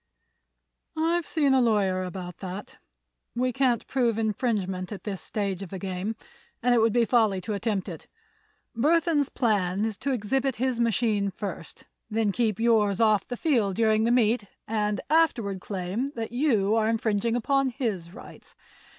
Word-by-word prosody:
"I've 335 +1 +1
seen 290 -4 +2
a 260 - +4
lawyer 200 -5 +2
about 180 -1 -6
that. 190 +1 -8 0.6
We 250 +1 0
can't 250 -2 +1
prove 240 -4 0
infringement 210 -4 -1
at 205 - -7
this 200 -3 -4
stage 200 -3 -3
of 195 - -7
the 190 - -6
game 190 +3 -4 0.5
and 245 0 +4
it 240 - +4
would 225 0 +3
be 235 +1 +3
folly 220 -5 +2
to 210 - -4
attempt 205 -2 -2
it. 170 -4 -8 0.7
Burthon's 305 +2 +2
plan 205 -4 0
is 220 -3 -3
to 280 - -2
exhibit 260 +3 0
his 255 0 -1
machine 220 -3 +1
first, 190 -4 -7 0.2
then 220 -2 +1
keep 220 -1 0
yours 220 -4 +3
off 215 -3 +3
the 245 - -5
field 230 - +1
during 220 0 +3
the 235 - +2
meet 235 -2 +2 0.2
and 210 -1 -1
afterward 235 - +2
claim 200 +9 -3
that 225 -1 -4
you 230 -6 +2
are 220 -1 +2
infringing 225 0 0
upon 275 +3 +1
his 215 - -3
rights. - - -13
220 Hz, 160 wpm, -26 LUFS, 200-245 Hz, 0.7 s, a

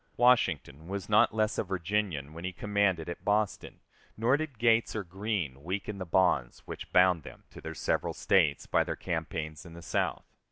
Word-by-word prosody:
Washington 115 - +2
was 100 +2 -5
not 105 +2 +5
less 110 -1 0
a - - +1
Virginian 90 -5 -2
when 85 +1 -9
he 95 - -2
commanded 100 -3 0
at 85 - -6
Boston, 105 0 -1 0.4
nor 115 +5 +3
did 150 -4 -4
Gates 115 0 +3
or 110 - -2
Greene 95 - -3
weaken 100 +3 -4
the 95 - -5
bonds 80 -9 +1
which - - -8
bound 90 -2 +5
them - - -12
to - - -11
their 80 0 -6
several 70 - -1
States 75 -7 +2
by - - +2
their - - -4
campaigns 80 -2 -4
in 85 -2 -12
the 85 - -10
South. - - -1
95 Hz, 185 wpm, -30 LUFS, 80-105 Hz, 0.4 s, not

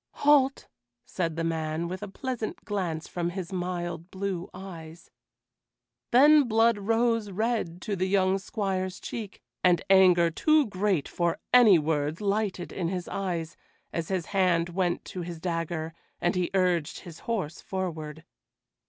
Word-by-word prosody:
"Halt!" 275 -2 +4 0.4
said 165 -4 -2
the 165 - -2
man, 160 0 -2
with 185 +3 -5
a 210 - -5
pleasant 240 +2 -5
glance 180 -7 -3
from 175 -1 -2
his 185 0 -6
mild 175 -1 -3
blue 190 -2 -4
eyes. 170 -3 -10 1.0
Then 290 +2 +6
blood 225 -1 +3
rose 225 +1 +1
red 200 -4 -2
to 205 - -2
the 185 0 0
young 190 0 +2
squire's 190 -2 -3
cheek, 215 -4 -7 0.2
and 175 -3 +4
anger 180 -3 +6
too 310 - +3
great 195 -5 0
for 170 -1 -1 0.2
any 230 -7 +8
words 150 0 -1
lighted 200 -3 -1
in 175 -3 -2
his 180 0 -3
eyes, 170 -4 -3 0.4
as 165 -2 -2
his 185 -4 -1
hand 175 -3 +2
went 175 0 -1
to 185 - -6
his 170 -1 -6
dagger, 165 -1 -3 0.3
and 175 - +1
he 180 -1 0
urged 175 -4 +1
his 170 -3 -11
horse 185 -9 -2
forward. 160 -5 -5
185 Hz, 145 wpm, -27 LUFS, 170-200 Hz, 1.0 s, any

